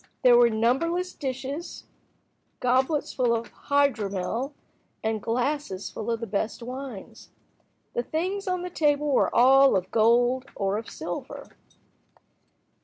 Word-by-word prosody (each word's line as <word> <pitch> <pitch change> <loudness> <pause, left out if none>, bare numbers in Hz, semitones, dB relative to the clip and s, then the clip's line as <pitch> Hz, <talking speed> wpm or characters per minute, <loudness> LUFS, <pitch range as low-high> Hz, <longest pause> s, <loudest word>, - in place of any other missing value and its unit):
There 245 -1 +7
were 240 0 +6
numberless 300 +12 0
dishes, 275 +4 -5 0.7
goblets 260 +4 +1
full 245 -3 +2
of 230 0 -5 0.2
hydromel, 230 -3 0 0.5
and 220 -1 -1
glasses 240 -4 -2
full 220 +1 -5
of 230 0 -1
the - - -2
best 220 +2 -3
wines. 255 -4 -8 0.6
The - - 0
things 370 +9 -3
on 365 -1 -1
the 360 - -5
table 295 -2 +1
were 265 - +3
all 270 +2 +6
of 185 0 -1
gold 245 +4 +3
or 200 +1 -1
of 225 - -9
silver. - - -7
250 Hz, 125 wpm, -26 LUFS, 225-285 Hz, 0.7 s, There